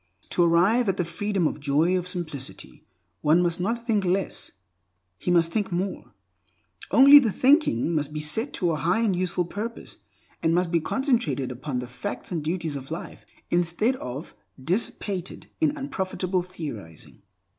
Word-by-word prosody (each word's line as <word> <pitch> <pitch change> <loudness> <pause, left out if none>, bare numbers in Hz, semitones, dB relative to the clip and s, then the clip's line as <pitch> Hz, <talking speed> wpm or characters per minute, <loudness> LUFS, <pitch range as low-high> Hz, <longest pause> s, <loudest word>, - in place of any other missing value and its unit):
To - - +1
arrive 190 +8 +3
at 190 - 0
the 180 - 0
freedom 195 +2 -1
and 150 - -5
joy 150 +6 +2
of 180 -1 -1
simplicity, 160 -7 -5 0.3
one 160 +4 +4
must 170 0 0
not 230 +5 -2
think 215 -4 +1
less, 185 +1 -2 0.7
he - - -3
must 170 -1 +3
think 210 -1 -1
more; 185 +2 -3 0.8
only 275 +7 +9
the 235 -6 +1
thinking 255 - +3
must 150 -2 -1
be 150 - -4
set 155 - +2
to 175 -3 0
a 155 - -1
high 180 +9 +1
and 210 -5 +2
useful 180 0 0
purpose, 215 +6 -6 0.4
and 165 0 +2
must 175 -1 +1
be 170 - +3
concentrated 240 - 0
upon 130 +2 -4
the 125 0 -4
facts 165 +14 -5
and 165 -4 -2
duties 165 -1 -2
of 135 -1 -7
life, 165 +2 -7 0.2
instead 175 +8 +1
of 130 - -7 0.3
dissipated 185 - -3
in 305 -2 +1
unprofitable 190 -9 -2
theorizing. 145 - -9
180 Hz, 160 wpm, -25 LUFS, 160-205 Hz, 0.8 s, only